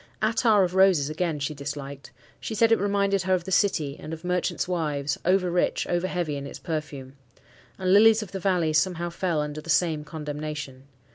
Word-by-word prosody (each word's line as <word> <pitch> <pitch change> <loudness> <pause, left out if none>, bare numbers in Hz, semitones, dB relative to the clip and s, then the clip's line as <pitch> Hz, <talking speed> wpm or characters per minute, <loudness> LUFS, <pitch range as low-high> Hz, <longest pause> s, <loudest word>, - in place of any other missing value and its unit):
Attar 220 -2 +3
of 180 -1 -1
roses, 185 -6 +4
again, 165 0 -1
she 145 +1 -3
disliked. 140 -1 -7 0.3
She 220 - -5
said 230 +1 +3
it 225 - +4
reminded 200 -1 +1
her 185 +1 +2
of 180 - -3
the 190 - -7
city 155 -8 +1
and 155 - -7
of 160 +1 -8
merchants' 180 0 -1
wives, 150 -5 -2
over 185 0 +2
rich, 175 - 0
over 175 +1 -1
heavy 170 -6 -2
in 140 0 -6
its - - -8
perfume. 150 -5 -5 0.6
And 185 -1 +1
lilies 220 +1 +6
of 195 - -12
the 195 - -4
valley 175 -4 +1
somehow 175 +2 0
fell 170 -3 -1
under 150 0 -5
the 160 - -13
same 155 -1 +2
condemnation. 150 -3 -6
170 Hz, 195 wpm, -25 LUFS, 150-190 Hz, 0.6 s, lilies